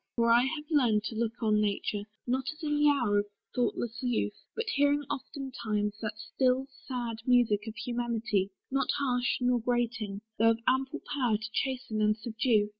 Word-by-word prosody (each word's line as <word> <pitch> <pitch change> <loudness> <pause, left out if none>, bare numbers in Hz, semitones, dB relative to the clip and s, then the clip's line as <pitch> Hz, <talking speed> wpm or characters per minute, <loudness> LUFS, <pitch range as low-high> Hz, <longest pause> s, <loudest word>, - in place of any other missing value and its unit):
For 235 -1 +3
I 240 +2 +6
have 300 +2 -3
learned 235 -8 +3
To 220 - -4
look 230 +1 -2
on 215 -1 +3
nature, 205 0 -1 0.2
not 255 +1 0
as 310 +2 -13
in 295 -1 +1
the 295 0 +4
hour 235 -8 +3
Of 205 - -2 0.3
thoughtless 235 -1 -1
youth, 245 -4 0 0.2
but 455 - -1
hearing 285 +1 +3
oftentimes 220 -7 -3
The 215 -2 -2 0.2
still, 260 0 +3 0.2
sad 240 -3 -3
music 230 -4 +3
of 220 - -5
humanity, 235 -5 -1 0.2
Not 275 0 +1
harsh 250 -3 +1
nor 250 0 +3
grating, 230 -4 -1 0.2
though 225 +1 +6
of 225 0 +2
ample 265 +4 +1
power 245 -7 +2
To 220 +1 -6
chasten 255 -5 -1
and 210 0 +3
subdue. 220 -1 +1
240 Hz, 175 wpm, -30 LUFS, 215-260 Hz, 0.3 s, I